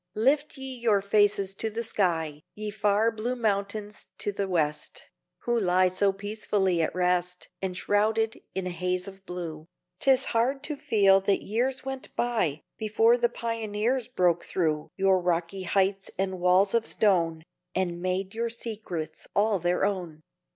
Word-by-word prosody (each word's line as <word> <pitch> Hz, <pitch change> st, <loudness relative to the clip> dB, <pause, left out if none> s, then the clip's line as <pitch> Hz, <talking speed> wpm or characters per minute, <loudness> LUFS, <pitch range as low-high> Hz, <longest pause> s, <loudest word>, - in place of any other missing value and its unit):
Lift 285 Hz, +7 st, +1 dB
ye 265 Hz, 0 st, -4 dB
your 220 Hz, -4 st, +3 dB
faces 200 Hz, -1 st, +2 dB
to 220 Hz, +3 st, -1 dB
the 225 Hz, +2 st, -4 dB
sky 165 Hz, -9 st, 0 dB
Ye 210 Hz, 0 st, -4 dB
far 210 Hz, +2 st, +2 dB
blue 230 Hz, +3 st, -3 dB
mountains 210 Hz, -2 st, -2 dB, 0.2 s
of 205 Hz, -, -1 dB
the 200 Hz, -1 st, -1 dB
West, 155 Hz, -5 st, -2 dB, 0.4 s
Who 240 Hz, 0 st, +1 dB
lie 185 Hz, -2 st, +3 dB
so 195 Hz, +2 st, +2 dB
peacefully 200 Hz, -3 st, 0 dB
at 160 Hz, -, -1 dB
rest 180 Hz, 0 st, 0 dB
Enshrouded 210 Hz, +4 st, 0 dB
in 190 Hz, -1 st, -2 dB
a 180 Hz, -, -2 dB
haze 180 Hz, +1 st, -1 dB
of 195 Hz, 0 st, -12 dB
blue; 165 Hz, -3 st, -6 dB, 0.3 s
'Tis 265 Hz, -2 st, +4 dB
hard 255 Hz, +4 st, +1 dB
to 300 Hz, -, -2 dB
feel 195 Hz, -7 st, +4 dB
that 195 Hz, 0 st, +1 dB
years 255 Hz, +6 st, -1 dB
went 265 Hz, -1 st, -5 dB
by 215 Hz, -12 st, 0 dB, 0.2 s
Before 225 Hz, +2 st, +4 dB
the 240 Hz, -1 st, +2 dB
pioneers 230 Hz, +1 st, -2 dB
broke 180 Hz, -8 st, +1 dB
through 155 Hz, -4 st, -1 dB
Your 190 Hz, -1 st, +4 dB
rocky 175 Hz, +2 st, -1 dB
heights 195 Hz, +2 st, +1 dB
and 190 Hz, -1 st, -2 dB
walls 180 Hz, +2 st, +4 dB
of 230 Hz, -1 st, +1 dB
stone, 165 Hz, -6 st, +2 dB, 0.3 s
And 175 Hz, -2 st, -1 dB
made 185 Hz, +1 st, -2 dB
your 230 Hz, +1 st, -1 dB
secrets 215 Hz, -8 st, -5 dB
all 205 Hz, -1 st, +3 dB
their 175 Hz, +2 st, +1 dB
own. 175 Hz, -6 st, -3 dB
200 Hz, 155 wpm, -27 LUFS, 180-225 Hz, 0.4 s, Tis